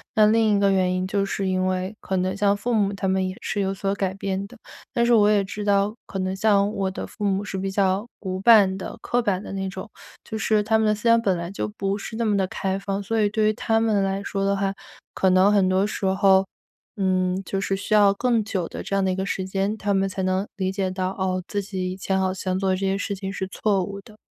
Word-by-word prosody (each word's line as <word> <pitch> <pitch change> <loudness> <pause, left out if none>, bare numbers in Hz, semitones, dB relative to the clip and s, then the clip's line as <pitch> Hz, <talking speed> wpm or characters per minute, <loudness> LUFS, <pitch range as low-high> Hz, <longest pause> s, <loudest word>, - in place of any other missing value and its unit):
那 215 - +6
另 220 0 +3
一 - - +1
个 200 -1 +3
原 185 -1 +2
因 185 0 -1
就 200 +1 0
是 195 0 -2
因 185 0 0
为 185 +2 -2
可 190 - -2
能 185 +1 0
像 200 0 +2
父 235 +4 -2
母 205 -3 +2
他 195 0 -3
们 190 0 +1
也 185 - -7
是 205 - -2
有 195 -1 0
所 195 0 -2
改 190 -2 -2
变 195 0 -3
的。 245 - -15 0.3
但 235 - +1
是 240 - +4
我 210 -2 +5
也 205 -2 +3
知 205 +2 -6
道， 200 0 +2
可 - - -6
能 185 0 -1
像 200 0 +2
我 195 -3 -1
的 190 - -5
父 210 - -9
母 200 0 +1
是 195 -2 -4
比 195 +1 -2
较 195 +2 +1
古 185 -2 -4
板 205 -4 +6
的、 - - -7
刻 245 - +1
板 200 -5 0
的 - - -8
那 195 -1 -3
种， 190 +3 -7 0.4
就 - - -7
是 215 -1 +1
他 220 +1 +2
们 220 - +2
的 215 - +3
思 210 - -12
想 230 0 +5
本 195 -5 +1
来 170 +1 -5
就 200 - -3
不 195 0 -1
是 220 - -7
那 230 - 0
么 210 -2 +2
地 190 -1 +1
开 190 +1 -2
放。 195 0 -3
所 225 +3 0
以 205 - +3
对 215 0 +1
于 - - +1
他 225 +1 +1
们 220 -3 +2
来 195 +1 -1
说 195 -1 -2
的 200 0 +2
话， 195 0 0 0.4
可 190 - +2
能 185 +2 +5
很 195 -2 +3
多 190 +1 +2
时 205 -2 -2
候， 190 0 +4 0.5
嗯， 185 -1 +1
就 195 +2 -2
是 195 - 0
需 200 - -3
要 205 -2 +6
更 235 0 +1
久 190 -5 -3
的 - - -7
这 195 - -3
样 195 -1 +2
的 190 - +1
一 - - -1
个 190 - -2
时 190 -1 -2
间， 195 +3 -1
他 200 -1 -1
们 195 0 +1
才 190 0 -4
能 185 +2 0
理 190 -1 -1
解 190 -1 -1
到， 185 0 -2
哦， 185 -1 -2
自 205 - -2
己 190 -2 -4
以 - - -5
前 190 0 -1
好 190 0 0
像 185 -1 -2
做 190 0 0
的 - - +2
这 - - -5
些 190 0 0
事 200 - -3
情 195 0 -5
是 190 -1 -4
错 195 0 0
误 200 +2 -6
的。 210 +2 -17
195 Hz, 295 characters per minute, -24 LUFS, 190-205 Hz, 0.5 s, 那